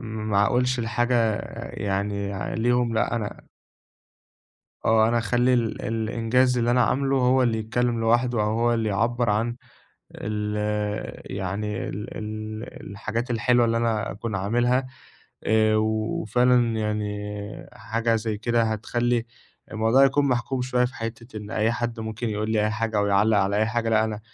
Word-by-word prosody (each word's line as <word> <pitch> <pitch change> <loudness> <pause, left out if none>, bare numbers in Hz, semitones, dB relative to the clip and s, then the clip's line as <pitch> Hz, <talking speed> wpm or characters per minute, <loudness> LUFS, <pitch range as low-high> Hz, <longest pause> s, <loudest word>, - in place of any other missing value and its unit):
ما 110 -3 0
أقولش 125 +1 +1
الحاجة 115 -1 +1 0.4
يعني 100 0 -2 0.3
ليهم، 120 0 +1
لأ 120 - +1
أنا 105 -2 -5 1.4
آه، 110 0 +5
أنا 120 +1 +2
أخلّي 120 +2 +2
ال 115 -3 0
الإنجاز 115 +3 +1
اللي 120 0 +2
أنا 125 -1 +4
عاملُه 135 +2 +1
هو 130 0 +3
اللي 115 -2 +1
يتكلم 115 +2 0
لوحده 120 0 +2
أو 105 - +1
هو 120 0 +3
اللي 110 -2 0
يعبّر 115 +3 +1
عن 115 +3 0 0.6
ال 105 0 -3 0.8
يعني 100 +2 -3
ال 105 +3 -6
ال 110 0 -5 0.3
الحاجات 115 +4 -3
الحلوة 120 +1 +3
اللي 115 0 +1
أنا 115 -2 0
أكون 105 +1 -4
عاملها 120 +6 +1 0.6
آآ، 110 0 +3
وفعلًا 115 +2 +2
يعني 105 -1 -1 0.7
حاجة 115 -1 -1
زي 110 -1 -2
كده 120 +1 +1
هتخلّي 120 +2 0 0.5
الموضوع 115 +5 +4
يكون 140 +1 +2
محكوم 125 +1 0
شوية 125 0 +1
في 125 - -6
حتّة 115 0 -6
إن 105 +1 -8
أي 110 +2 +1
حد 120 -1 -3
ممكن 110 +1 -3
يقول 105 +1 -2
لي 110 -1 +2
أي - - +1
حاجة 110 0 -1
أو 100 - +2
يعلّق 100 +2 +3
على 100 +1 +1
أي 110 - +3
حاجة، 115 0 -1
لأ، 110 0 +3
أنا 110 -1 -3
115 Hz, 155 wpm, -25 LUFS, 110-120 Hz, 1.4 s, آه